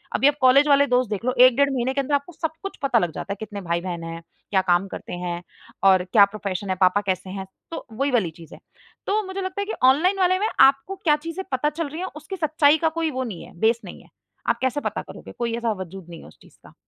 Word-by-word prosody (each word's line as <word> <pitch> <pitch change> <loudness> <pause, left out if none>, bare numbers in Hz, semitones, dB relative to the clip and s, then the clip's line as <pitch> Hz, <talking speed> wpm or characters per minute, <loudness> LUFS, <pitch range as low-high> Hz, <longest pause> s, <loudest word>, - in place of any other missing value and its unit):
अभी 275 - +4
आप 290 - +3
कॉलेज 265 +3 +6
वाले 285 0 +5
दोस्त 250 -2 +1
देख 210 +2 -3
लो 255 - +1
1 255 -1 +8
डेढ़ 280 0 +4
महीने 260 +1 -1
के 275 - 0
अंदर 285 +2 0
आपको 285 +5 -3
सब 320 0 -3
कुछ 390 - -6
पता 260 -4 +3
लग 175 -5 -1
जाता 200 - -4
है। 200 - -10
कितने 205 -2 -6
भाई-बहन 170 -1 -3
हैं, 165 0 -6 0.3
क्या 190 -2 +3
काम 180 +1 +2
करते - - -8
हैं, 175 0 -4 0.4
और 190 -2 +5
क्या 205 -3 +8
प्रोफेशन 200 -1 -5
है, 185 - +1
पापा 185 +2 +4
कैसे 185 0 -2
हैं, 190 0 -5 0.3
तो 330 - -6
वही 275 +5 -1
वाली 210 -10 +1
चीज़ 165 -2 -13
है। - - -12 0.5
तो 420 +2 +2
मुझे 380 +1 -4
लगता 375 +1 -3
है - - -2
कि 430 - -4 0.2
ऑनलाइन 360 +9 +2
वाले 370 0 +3
में 425 - +1
आपको 275 +8 +4
क्या 300 -3 +4
चीज़ें 360 +3 -5
पता 265 +3 +1
चल 315 0 -4
रही 315 +4 -6
हैं 375 - -3
उसकी 310 +5 -7
सच्चाई 310 -1 +3
का - - +5
कोई 325 -1 0
वो 260 -1 -2
नहीं 215 -8 -7
है, - - -14
बेस 230 +3 +2
नहीं - - -10
है। - - -23 0.4
आप - - +1
कैसे 260 +2 0
पता - - -3
करोगे? - - -11
कोई 235 -1 -1
ऐसा 235 -1 -1
वजूद 185 0 -11
नहीं 170 - -10
है - - -13
उस - - -18
चीज़ - - -20
का। - - -16
255 Hz, 265 wpm, -23 LUFS, 190-300 Hz, 0.5 s, 1